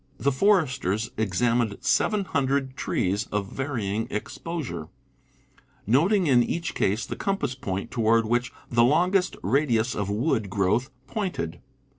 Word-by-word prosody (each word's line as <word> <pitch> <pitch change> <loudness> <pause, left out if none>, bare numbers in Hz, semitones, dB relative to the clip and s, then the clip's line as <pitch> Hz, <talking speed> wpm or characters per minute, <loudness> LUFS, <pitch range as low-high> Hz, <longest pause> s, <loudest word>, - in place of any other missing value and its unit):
The 140 - +1
foresters 135 - +1
examined 110 +2 +1
700 140 -9 +1
trees, 100 -1 -1
of 100 -1 -3
varying 115 -6 -2
exposure, 125 - -5 1.0
noting 175 - +3
in 130 -5 +5
each 170 +7 -2
case 105 +4 0
the - - -5
compass 195 -10 -1
point 100 -3 -4
toward 115 -1 +3
which 120 +3 0 0.2
the 120 -1 +3
longest 180 +8 +3
radius 120 +1 +2
of 100 -1 -2
wood 110 -1 0
growth 100 +7 +1 0.2
pointed. 135 - -3
120 Hz, 120 wpm, -26 LUFS, 105-145 Hz, 1.0 s, in